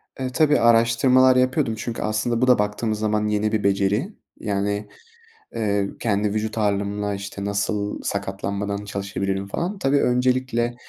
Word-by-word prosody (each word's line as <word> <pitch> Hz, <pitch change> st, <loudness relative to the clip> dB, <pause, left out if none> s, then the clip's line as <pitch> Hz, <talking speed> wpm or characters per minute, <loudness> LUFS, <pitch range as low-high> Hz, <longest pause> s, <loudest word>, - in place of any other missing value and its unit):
E, 130 Hz, -1 st, -3 dB
tabii, 150 Hz, +2 st, +3 dB
araştırmalar 120 Hz, +3 st, +4 dB
yapıyordum. 130 Hz, -1 st, +1 dB
Çünkü 115 Hz, +1 st, -4 dB
aslında 110 Hz, +2 st, -1 dB
bu 130 Hz, -, +3 dB
da 125 Hz, -3 st, +5 dB
baktığımız 105 Hz, +1 st, -1 dB
zaman 105 Hz, 0 st, 0 dB
yeni 105 Hz, 0 st, 0 dB
bir 110 Hz, -2 st, 0 dB
beceri, 100 Hz, -, +1 dB, 0.3 s
yani, 100 Hz, 0 st, -2 dB, 0.7 s
ııı, 100 Hz, -3 st, -1 dB
kendi 105 Hz, -2 st, 0 dB
vücut 110 Hz, +1 st, -2 dB
ağırlığımla, 105 Hz, 0 st, -1 dB
işte, 100 Hz, 0 st, -6 dB
nasıl 100 Hz, +1 st, -2 dB
sakatlanmadan 100 Hz, +1 st, -3 dB
çalışabilirim 100 Hz, -1 st, -3 dB
falan. 180 Hz, -, -3 dB
Tabii, 140 Hz, -5 st, +2 dB
öncelikle 125 Hz, -1 st, +1 dB
105 Hz, 140 wpm, -23 LUFS, 100-125 Hz, 0.7 s, da